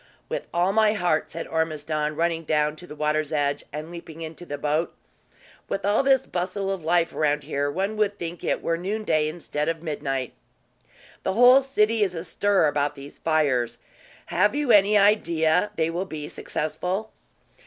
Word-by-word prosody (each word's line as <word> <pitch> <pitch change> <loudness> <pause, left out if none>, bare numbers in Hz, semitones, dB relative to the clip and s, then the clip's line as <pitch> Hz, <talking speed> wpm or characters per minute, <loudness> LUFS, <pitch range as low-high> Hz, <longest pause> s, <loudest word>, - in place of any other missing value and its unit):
"With - - -4
all 175 +3 +1
my 215 0 +4
heart," 175 -6 0
said 165 +1 -5
Ormiston, 155 -1 -1
running 165 +1 0
down 150 -1 +1
to 180 - -12
the 150 - -9
water's 150 0 0
edge, 145 -2 0
and 155 +3 -6
leaping 165 -1 -9
into 160 +2 -8
the 145 - -4
boat. 150 +3 -1 0.7
"With 195 -1 -2
all 205 +4 +3
this 270 -1 +3
bustle 190 +2 -2
of 190 -4 -4
life 170 +1 +2
around 150 -1 +1
here, 145 -1 -1
one 195 +8 -2
would 205 -1 +1
think 170 -1 -6
it - - -1
were 165 0 0
noonday 185 -5 0
instead 155 -1 -3
of 165 0 -3
midnight." 135 -5 -3 0.9
"The 190 - -1
whole 245 +5 +7
city 230 -5 +1
is 190 -3 +1
astir 185 +2 +1
about 145 -1 0
these 140 +1 -11
fires. 130 -7 +1 0.5
Have 205 +9 +2
you 290 -4 +1
any 205 0 +6
idea 180 -3 +3
they 160 0 0
will 175 +3 -2
be 155 -5 -6
successful?" 180 +10 -3
165 Hz, 170 wpm, -25 LUFS, 150-195 Hz, 0.9 s, whole